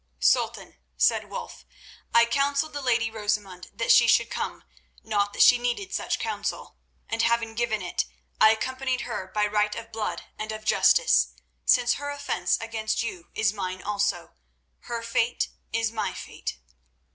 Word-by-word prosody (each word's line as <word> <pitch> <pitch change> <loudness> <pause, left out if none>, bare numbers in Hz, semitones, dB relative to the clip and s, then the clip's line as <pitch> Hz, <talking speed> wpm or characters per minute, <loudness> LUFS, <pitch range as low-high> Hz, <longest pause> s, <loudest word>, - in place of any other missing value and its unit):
"Sultan," - - +1 0.2
said 65 +1 +2
Wulf, - - -7 0.5
"I 235 0 +6
counselled 280 +5 0
the 290 - -4
lady 235 -3 +1
Rosamund 205 -4 -3
that - - 0
she - - +7
should - - +4
come—not 205 -2 -4
that - - +4
she 245 - +7
needed 245 +11 -2
such - - -1
counsel—and, 225 0 -5
having 230 -1 +1
given 220 -3 -1
it, 175 0 -1 0.3
I 220 - +8
accompanied 260 +3 -1
her 210 -6 -4
by 210 +2 0
right 210 0 +1
of 230 0 -8
blood 220 -1 -3 0.2
and 215 0 -3
of 215 0 -7
Justice, - - +4 0.3
since 245 -1 +4
her 285 - -3
offence 285 0 -1
against 225 -1 -2
you 180 -7 -6
is 215 -2 +2
mine 185 -2 -4
also. 200 -4 -1 0.5
Her 235 -1 -4
fate 230 +1 0 0.2
is 225 0 0
my 220 -1 -2
fate." - - -6
225 Hz, 150 wpm, -26 LUFS, 210-245 Hz, 0.5 s, I